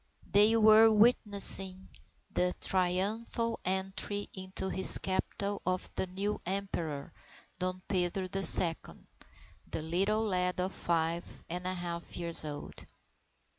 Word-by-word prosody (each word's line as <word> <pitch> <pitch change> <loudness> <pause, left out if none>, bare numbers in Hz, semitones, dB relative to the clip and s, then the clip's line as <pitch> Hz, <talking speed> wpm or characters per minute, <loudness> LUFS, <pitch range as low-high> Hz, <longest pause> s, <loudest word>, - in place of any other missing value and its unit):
They 210 +3 +4
were 220 0 +5
witnessing 200 -4 +2 0.5
the 180 0 -1
triumphal 205 +5 -2
entry 190 +2 -3
into 190 0 -6
his 190 0 +5
capital 200 +1 -4
of 185 0 -3
the - - -3
new 200 +3 -5
Emperor, 175 -5 -6 0.5
Dom 185 0 -4
Pedro 185 0 -2
the 195 +1 -4
Second, 165 -2 +7 0.6
the 155 - -6
little 195 +7 -1
lad 180 -3 -2
of 185 +1 -3
five 170 0 -4
and 180 +2 -6
a 185 - -4
half 170 -1 -8
years 170 -2 -3
old. 145 -1 -9
185 Hz, 120 wpm, -29 LUFS, 175-200 Hz, 0.6 s, Second